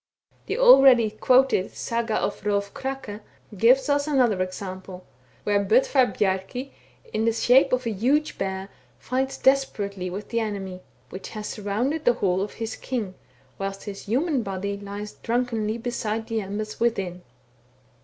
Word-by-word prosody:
The - - -2
already 270 - +7
quoted 255 -2 +3
Saga 230 -1 -2
of 205 - -2
Hrolf 200 0 -1
Krake 265 -6 -5 0.4
gives 245 +8 +4
us 285 0 +1
another 245 -10 +2
example, 185 0 -6 0.4
where 205 -1 +2
Bodvar 250 +5 +4
Bjarki, 200 +8 -2 0.4
in 220 - 0
the 230 - +4
shape 250 +4 +4
of 255 0 +1
a 230 - 0
huge 265 +9 0
bear, 190 0 -3 0.3
fights 265 +2 -2
desperately 200 -9 +1
with 195 +4 -7
the 230 - 0
enemy, 195 -4 -4 0.3
which 190 - -7
has 210 -1 -6
surrounded 235 +10 -2
the 245 - +5
hall 190 -5 0
of 200 - -4
his 225 -1 -5
king, 225 -8 -4 0.5
whilst 195 0 -4
his 200 -2 -7
human 270 - +1
body 200 -1 -3
lies 205 +1 -7
drunkenly 230 -2 -1
beside 225 -2 -3
the 225 -1 -1
embers 210 +2 -5
within. 195 -6 -1
215 Hz, 145 wpm, -25 LUFS, 200-255 Hz, 0.5 s, already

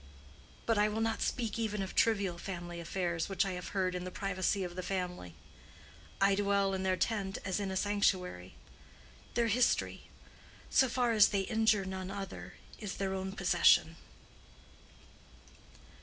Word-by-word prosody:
But 225 -2 +2
I 210 +1 +4
will 215 +1 -2
not 225 0 0
speak 230 -3 -1
even 210 -3 -1
of 190 - -6
trivial 200 -6 +2
family 175 -2 -6
affairs 170 0 -2
which 195 0 +1
I 195 - -2
have 180 -1 -5
heard 185 -2 -1
in 180 0 -3
the 185 - -4
privacy 195 +1 -1
of 175 -1 -6
the 185 - -3
family. 180 - -4 0.8
I 195 0 +4
dwell 200 -1 +2
in 190 - -2
their 185 -1 +1
tent 195 -3 -1
as 190 0 -1
in 200 -1 -2
a 190 - -2
sanctuary. 185 - 0 0.8
Their 235 0 +3
history, 235 +2 +1 0.6
so 265 - +4
far 245 0 +1
as 215 -2 +7
they 200 -1 0
injure 220 -1 +2
none 190 0 -5
other, 195 - -7 0.2
is 205 -3 -5
their 195 -1 -2
own 190 0 -3
possession." - - +4
195 Hz, 155 wpm, -32 LUFS, 185-210 Hz, 0.8 s, as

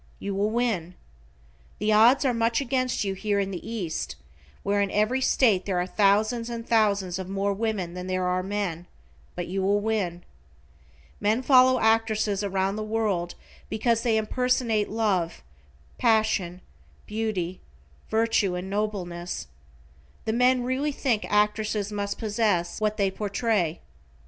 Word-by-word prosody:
You 200 - -4
will 200 +2 +1
win. 215 -7 -1 0.8
The 215 +1 +1
odds 240 +6 +6
are 255 - +3
much 230 0 +1
against 255 -3 0
you 195 -1 -1
here 200 +1 -1
in 195 0 -1
the 180 - -6
East, 185 - -3 0.5
where 200 0 +1
in 200 - +1
every 215 +7 +1
state 220 -8 +3
there 185 -3 0
are 180 - 0
thousands 215 +4 +2
and 235 -1 -6
thousands 200 -5 +2
of 185 -1 -6
more 200 +1 0
women 200 -5 -2
than 180 0 -6
there 185 0 -1
are 180 0 +1
men, 185 -3 -3 0.5
but 175 - -3
you 190 +2 -3
will 200 +2 +2
win. 200 -5 -2 1.0
Men 220 +5 +1
follow 255 -1 +6
actresses 220 -2 +1
around 195 0 -1
the 215 - -3
world 210 -6 -1 0.3
because 230 +1 +1
they 230 -2 +2
impersonate 225 -1 0
love, 200 - -1 0.6
passion, 215 -5 +1 0.4
beauty, 210 -5 -3 0.5
virtue 220 -4 +1
and 185 +2 -5
nobleness. 185 -4 -3 0.8
The 220 - 0
men 250 +1 +3
really 260 +4 -1
think 250 -6 -1
actresses 210 0 +1
must 200 -1 -3
possess 205 -5 0
what 215 0 0
they 195 -2 +1
portray. 200 -4 -1
210 Hz, 145 wpm, -26 LUFS, 190-225 Hz, 1.0 s, odds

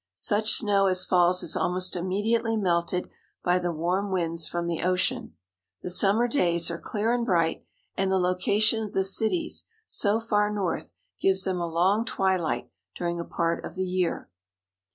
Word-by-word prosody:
Such 215 0 +1
snow 200 -3 +3
as 185 -1 +2
falls 180 0 +3
is 155 - -1
almost 185 +1 -1
immediately 220 +6 0
melted 180 -2 0 0.4
by 180 +1 +2
the 175 -1 -2
warm 180 +5 -1
winds 170 -3 -1
from 175 0 -3
the 170 -1 -2
ocean. 185 +7 0 0.5
The 180 - -2
summer 200 +6 +3
days 170 - +1
are 170 - -5
clear 220 +2 -1
and 245 -1 0
bright, 170 -7 0 0.3
and 190 0 0
the 190 - +3
location 200 +5 +2
of 210 - -7
the 190 - +1
cities 220 - 0 0.2
so 210 - +2
far 210 -2 0
north 200 -5 -3 0.3
gives 190 0 +2
them 185 -2 -1
a 170 - -2
long 185 +7 +2
twilight 185 - -1 0.2
during 170 -1 -3
a - - -3
part 170 0 -2
of - - -8
the 185 0 -2
year. 180 -2 -2
185 Hz, 170 wpm, -26 LUFS, 175-210 Hz, 0.5 s, snow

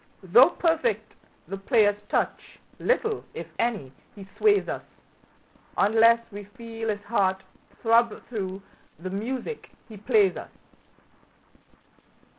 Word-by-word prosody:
Though 235 - +7
perfect 335 +7 0 0.3
the 195 - -5
player's 205 -1 +2
touch, - - -2 0.2
little, 450 -2 0
if - - -5
any, 215 - -1 0.2
he 195 -2 -11
sways 410 -2 +3
us, - - -3 1.0
Unless 230 +2 +4
we 205 0 -8
feel 225 -1 -5
his 205 -1 -2
heart 190 -4 0 0.4
throb 230 -1 +3
through 195 -4 -5 0.3
the 185 +4 -6
music 255 - -4 0.2
he 220 - -11
plays 210 -3 +3
us. - - -8
225 Hz, 110 wpm, -26 LUFS, 200-240 Hz, 1.0 s, Though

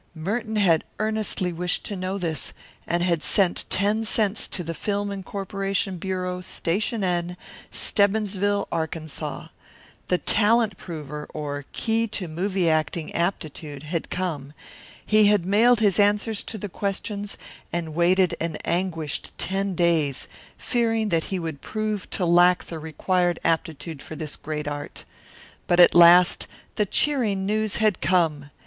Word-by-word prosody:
Merton 215 +7 -3
had 175 -7 +4
earnestly 215 -4 -1
wished 180 +2 -1
to 205 - -4
know 185 +1 -3
this, 165 -5 -2 0.3
and 175 +1 +1
had 170 -3 +1
sent 185 0 +2
ten 205 +3 +2
cents 215 -1 0
to 180 - -3
the 165 0 -4
Film 205 +3 -2
Incorporation 195 -1 -3
Bureau, 180 0 -3
Station 200 +5 -1
N, 175 -1 -1 0.3
Stebbinsville, 205 -1 +1
Arkansas. 160 -2 -4 0.6
The 180 - +2
Talent 215 +4 +3
Prover, 150 -4 -7
or 145 -2 -4
Key 225 0 0
to 185 - -2
Movie 180 +3 -1
Acting 155 0 0
Aptitude, 155 -4 -3
had 165 +2 -3
come; 155 -6 -3 0.5
he 215 -1 +5
had 205 -4 +3
mailed 225 +4 +4
his 205 -2 +3
answers 205 +1 +2
to 220 - -4
the 205 - -5
questions 200 +1 -4 0.3
and 165 -2 -3
waited 180 +2 +3
an 165 -1 -2
anguished 165 -4 -2
ten 195 0 -1
days, 160 -6 +1 0.3
fearing 225 -3 0
that 165 -3 +1
he 190 - -3
would 160 -5 -5
prove 215 -2 -3
to 185 - -1
lack 175 +1 +5
the 165 - -7
required 175 +3 0
aptitude 160 -2 -2
for 155 - -8
this 155 -2 -5
great 150 -1 -5
art. 145 0 -6 0.6
But 175 - +3
at 175 - +8
last 175 +1 +7 0.3
the 210 - +1
cheering 220 -8 +1
news 215 0 0
had 215 -5 +1
come. 155 -4 +1
180 Hz, 140 wpm, -24 LUFS, 165-205 Hz, 0.6 s, at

